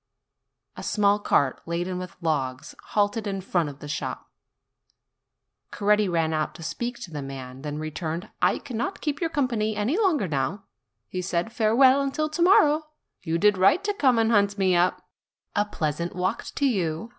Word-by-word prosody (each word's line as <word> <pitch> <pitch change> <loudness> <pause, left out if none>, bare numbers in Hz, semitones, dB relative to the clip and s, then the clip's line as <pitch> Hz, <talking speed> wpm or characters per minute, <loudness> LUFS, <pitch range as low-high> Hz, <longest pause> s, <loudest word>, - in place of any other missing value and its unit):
A - - -8
small 205 -1 +2
cart 140 -9 +1
laden 175 +2 -2
with 185 0 -7
logs 135 -6 -2
halted 205 +1 0
in 195 -1 -2
front 175 -4 0
of 140 - -10
the 150 - -7
shop. 150 - -5 1.4
Coretti 210 -1 +2
ran 165 -2 +1
out 155 -1 -1
to 165 - -9
speak 240 +8 -4
to 180 - -8
the 150 -2 -5
man, 135 -1 -8
then 150 0 -4
re 155 0 -4
turned: 160 +2 -4
"I 180 +2 +3
cannot 265 - -4
keep 295 0 -2
your 330 - +1
company 235 -8 0
any 235 - 0
longer 325 - +2
now," 145 +6 -2 0.4
he 185 - -4
said; 180 +4 -2
"farewell 255 +5 +5
until 280 +3 -1
to 310 +3 -3
morrow. 310 -4 +5 0.4
You 165 +1 -1
did 205 +1 +3
right 250 - +4
to 415 0 0
come 260 -10 +3
and 225 0 +3
hunt 200 -1 +3
me 190 -2 +3
up. 175 +1 +1 0.5
A 205 - +2
pleasant 170 -3 -3
walk 185 +4 -1
to 285 - +1
you! 185 - -1
200 Hz, 180 wpm, -25 LUFS, 165-235 Hz, 1.4 s, farewell